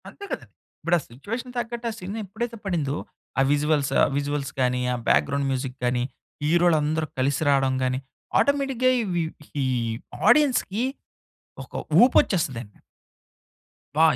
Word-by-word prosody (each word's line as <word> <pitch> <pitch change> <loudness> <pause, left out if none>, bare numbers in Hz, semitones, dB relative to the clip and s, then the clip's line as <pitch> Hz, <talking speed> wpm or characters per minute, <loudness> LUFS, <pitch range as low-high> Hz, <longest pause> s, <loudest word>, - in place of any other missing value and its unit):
అంతే 405 - -13
కదండి. - - -5 0.3
ఇప్పుడా 175 +1 +3
సిట్యుయేషన్‌కి 230 - -6
తగ్గట్టు, 235 0 -4
ఆ - - -7
సీన్ 195 0 -6
ఎప్పుడైతే 230 +4 -4
పడిందో. 155 -7 0 0.4
ఆ - - +5
విజువల్స్ 145 -1 +2 0.3
విజువల్స్ 145 -1 -2
కానీ 125 0 +2
ఆ - - 0
బ్యాక్‌గ్రౌండ్ 140 -1 +2
మ్యూజిక్ 130 0 -3
కాని 125 0 +1 0.4
హీరోలందరూ 160 -1 +3
కలిసి 135 +2 +1
రావడం 135 -2 +3
గాని, 130 0 0 0.4
ఆటోమేటిక్‌గా 270 -3 +2
ఇవి 175 -5 0 0.4
ఈ - - +1 0.6
ఆడియన్స్‌కి 250 -7 +3 0.8
ఒక - - -14 0.3
ఉపొచ్చేస్తదండి. 130 - +1 1.2
అబ్బ! 155 - +3
155 Hz, 120 wpm, -25 LUFS, 135-230 Hz, 1.2 s, ఆ